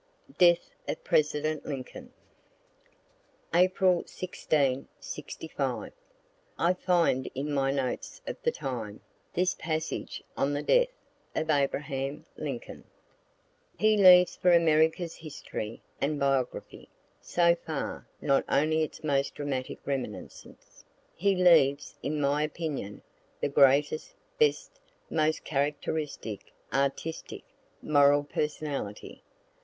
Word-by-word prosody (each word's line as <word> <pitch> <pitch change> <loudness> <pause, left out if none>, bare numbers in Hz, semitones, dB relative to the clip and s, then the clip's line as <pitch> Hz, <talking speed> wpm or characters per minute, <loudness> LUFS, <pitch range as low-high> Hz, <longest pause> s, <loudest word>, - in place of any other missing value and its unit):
DEATH 175 -1 +5 0.2
OF - - -4
PRESIDENT 155 0 +1
LINCOLN 135 -3 -7 1.4
April 185 0 +4
16, 140 -7 -1
'65. - - -5 0.6
I 170 +2 +3
find 170 -8 +1
in 145 +3 -2
my 135 -1 +1
notes 135 - -2
of - - -4
the 480 - +2
time, 115 - -5 0.3
this 180 +1 +2
passage 160 -1 -4
on 140 +1 0
the 145 +1 -2
death - - +4 0.5
of 160 0 0
Abraham 140 0 -1
Lincoln: 140 -6 -6 0.9
He 215 0 +4
leaves 180 -3 +7
for 180 - +3
America's 160 0 +3
history 125 -7 -7 0.2
and 145 +1 0
biography, 135 -2 -1 0.3
so 170 -1 +3
far, 160 -4 -5
not 140 -1 +2
only 155 +3 +2
its 155 - -4
most 140 -2 0
dramatic 135 -3 -3
reminiscence 135 -2 -6 0.3
he 195 +2 +2
leaves, 150 -6 +4
in 150 +1 -2
my 145 +1 +2
opinion, 150 -9 -4 0.4
the - - 0
greatest, 140 +2 +3 0.2
best, 460 +2 +1 0.3
most 155 0 +1
characteristic, 145 -5 -3 0.2
artistic, 140 +4 -2 0.4
moral 145 -1 +5
personality. 145 -7 -4
150 Hz, 105 wpm, -29 LUFS, 140-170 Hz, 1.4 s, leaves